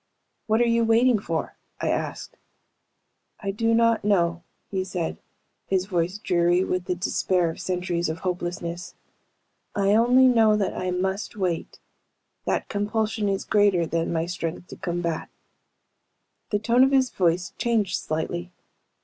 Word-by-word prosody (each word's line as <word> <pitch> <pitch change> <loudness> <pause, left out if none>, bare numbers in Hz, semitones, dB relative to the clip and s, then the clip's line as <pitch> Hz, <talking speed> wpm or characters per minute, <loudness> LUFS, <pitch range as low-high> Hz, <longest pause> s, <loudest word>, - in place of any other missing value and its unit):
"What 220 +1 +3
are 240 - +4
you 230 0 +3
waiting 230 +1 +4
for?" 165 -5 -3 0.2
I - - -1
asked. - - -4 1.0
"I 200 -2 -2
do 225 +3 0
not 230 -1 +3
know," 170 -4 +2 0.3
he 190 -1 -1
said, 180 -3 -4 0.5
his 185 -1 +1
voice 180 0 -1
dreary 175 -2 +2
with 185 -1 -2
the 180 - -1
despair 180 -1 +1
of - - -9
centuries 180 -2 -1
of 160 +1 -5
hopelessness. 175 -1 -4 0.8
"I 200 0 +3
only 245 +4 +5
know 225 -4 +5
that 200 -3 -1
I 185 - -2
must 190 +4 -2
wait 180 -5 -2 0.7
that - - -1
compulsion 210 0 -1
is 195 -1 -1
greater 200 -5 +3
than 165 0 -1
my 165 -1 0
strength 175 0 -5
to - - -8
combat." 170 -2 -3 1.2
The 205 - +1
tone 235 +4 +3
of 265 - +5
his 265 -2 +3
voice 175 0 0
changed 225 -5 +1
slightly. 175 +3 -3
190 Hz, 145 wpm, -25 LUFS, 175-215 Hz, 1.2 s, only